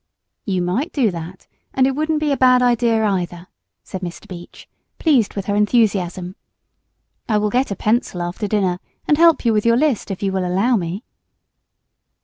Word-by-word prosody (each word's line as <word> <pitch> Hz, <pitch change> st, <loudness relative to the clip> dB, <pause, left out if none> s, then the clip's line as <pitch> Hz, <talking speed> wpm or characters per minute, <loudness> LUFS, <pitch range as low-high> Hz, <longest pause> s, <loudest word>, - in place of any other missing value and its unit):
"You 185 Hz, -3 st, -1 dB
might 220 Hz, -, -1 dB
do 245 Hz, -8 st, +1 dB
that, 170 Hz, +2 st, -8 dB, 0.3 s
and 260 Hz, -, +4 dB
it 270 Hz, -, +2 dB
wouldn't 310 Hz, +1 st, -1 dB
be 300 Hz, -1 st, 0 dB
a -, -, +2 dB
bad 255 Hz, -1 st, +4 dB
idea, 235 Hz, -2 st, +2 dB
either," 175 Hz, -3 st, -2 dB, 0.4 s
said 190 Hz, -, -7 dB
Mr. 175 Hz, -2 st, -7 dB
Beach, 175 Hz, -2 st, -11 dB, 0.3 s
pleased 270 Hz, -, +2 dB
with 200 Hz, -2 st, -4 dB
her 205 Hz, -, -1 dB
enthusiasm. 200 Hz, -4 st, +1 dB, 0.9 s
"I 215 Hz, -, +2 dB
will 210 Hz, 0 st, 0 dB
get 255 Hz, +4 st, +1 dB
a 200 Hz, -, -3 dB
pencil 210 Hz, -3 st, -1 dB
after 175 Hz, +4 st, -4 dB
dinner 190 Hz, -4 st, 0 dB, 0.3 s
and 300 Hz, 0 st, +2 dB
help 330 Hz, -5 st, +4 dB
you 230 Hz, -, +3 dB
with 210 Hz, -1 st, +1 dB
your 230 Hz, 0 st, +3 dB
list 280 Hz, -7 st, 0 dB
if 195 Hz, 0 st, -5 dB
you 195 Hz, -, 0 dB
will 190 Hz, -1 st, -1 dB
allow 195 Hz, +8 st, +1 dB
me." 185 Hz, +2 st, -3 dB
210 Hz, 180 wpm, -19 LUFS, 185-250 Hz, 0.9 s, and